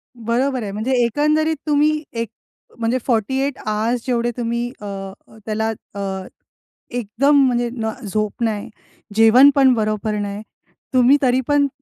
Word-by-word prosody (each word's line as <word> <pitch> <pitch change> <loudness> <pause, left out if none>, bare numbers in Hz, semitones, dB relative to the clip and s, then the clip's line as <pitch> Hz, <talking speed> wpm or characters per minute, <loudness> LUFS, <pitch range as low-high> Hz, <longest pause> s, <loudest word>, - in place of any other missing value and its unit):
बरोबर 245 +2 -1
आहे. 200 - -4
म्हणजे 220 +6 -3
एकंदरीत 305 +6 +1
तुम्ही 300 +1 +2
एक 230 -2 -3 0.5
म्हणजे 235 +2 0
48 265 +4 0
आर्स 225 +3 -1
जेवढे 240 -1 0
तुम्ही 235 0 -2
अ, - - -7 0.6
त्याला 220 0 -1 0.2
अ, 200 - -5 0.9
एकदम 250 +5 +2
म्हणजे 240 -2 +1
न 220 -2 -2
झोप 215 +3 -2
नाही, 215 -2 -2 0.5
जेवण 225 +5 +7
पण 265 -2 +5
बरोबर 215 -1 -1
नाही, 205 0 -4 0.5
तुम्ही 255 +3 +5
तरी 255 -1 +2
पण 290 -1 +3
240 Hz, 130 wpm, -20 LUFS, 220-265 Hz, 0.9 s, जेवण